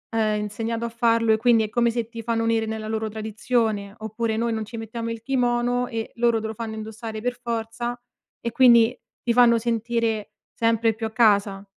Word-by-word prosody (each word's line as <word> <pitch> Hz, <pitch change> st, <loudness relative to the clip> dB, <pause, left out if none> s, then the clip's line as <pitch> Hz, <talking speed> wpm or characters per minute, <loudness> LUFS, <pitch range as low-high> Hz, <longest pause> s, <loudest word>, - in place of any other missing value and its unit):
ehm, 215 Hz, -1 st, +1 dB
insegnato 225 Hz, +2 st, -3 dB
a -, -, -3 dB
farlo 230 Hz, -1 st, +2 dB
e 220 Hz, -, +3 dB
quindi 230 Hz, -1 st, +4 dB
è 215 Hz, -, -3 dB
come 235 Hz, +2 st, +2 dB
se 230 Hz, -1 st, -2 dB
ti 230 Hz, -1 st, -7 dB
fanno 230 Hz, 0 st, -1 dB
unire 225 Hz, -1 st, +1 dB
nella 220 Hz, 0 st, -4 dB
loro 220 Hz, 0 st, -1 dB
tradizione, 220 Hz, -1 st, -1 dB
oppure 220 Hz, +1 st, -2 dB
noi 230 Hz, 0 st, 0 dB
non 220 Hz, -1 st, -3 dB
ci 225 Hz, +2 st, -8 dB
mettiamo 230 Hz, +1 st, -5 dB
il 230 Hz, -1 st, -6 dB
kimono 245 Hz, -1 st, +1 dB
e 225 Hz, -1 st, -4 dB
loro 235 Hz, -1 st, +2 dB
te 220 Hz, -, -4 dB
lo 220 Hz, -, -5 dB
fanno 220 Hz, 0 st, -5 dB
indossare 220 Hz, 0 st, -6 dB
per 245 Hz, +1 st, -3 dB
forza 235 Hz, +1 st, -3 dB, 0.4 s
e 235 Hz, -, -3 dB
quindi 235 Hz, -1 st, +6 dB, 0.3 s
ti 235 Hz, -, +1 dB
fanno 235 Hz, -1 st, +6 dB
sentire 230 Hz, -2 st, -1 dB, 0.2 s
sempre 230 Hz, 0 st, +2 dB
più 220 Hz, +1 st, -4 dB
a 220 Hz, -, -10 dB
casa. 205 Hz, -3 st, +2 dB
230 Hz, 200 wpm, -24 LUFS, 220-235 Hz, 0.4 s, quindi